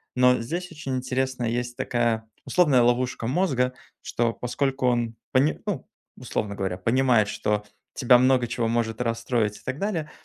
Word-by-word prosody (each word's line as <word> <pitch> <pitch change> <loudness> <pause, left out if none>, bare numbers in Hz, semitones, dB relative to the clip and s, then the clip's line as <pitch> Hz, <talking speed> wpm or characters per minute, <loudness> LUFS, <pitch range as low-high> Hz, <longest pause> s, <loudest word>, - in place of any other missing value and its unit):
Но 125 0 +5
здесь 175 +10 -4
очень 150 -5 -4
интересная 130 -1 -1
есть 120 +1 -2
такая 115 -2 0 0.2
условная 150 -9 +4
ловушка 120 0 +1
мозга, 130 -4 +1 0.3
что, 115 -1 0
поскольку 135 +2 -1
он 120 -2 0 0.2
пони 135 +4 +2
ну, - - -3 0.3
условно 105 -1 -3
говоря, 95 -2 -2
понимает, 115 +1 +3
что 105 0 -1 0.3
тебя 125 -2 +6
много 130 -1 +3
чего 115 0 -1
может 115 -1 -1
расстроить 115 -2 0
и - - -17
так 130 +3 -4
далее, 175 -7 -2
125 Hz, 150 wpm, -25 LUFS, 115-130 Hz, 0.3 s, тебя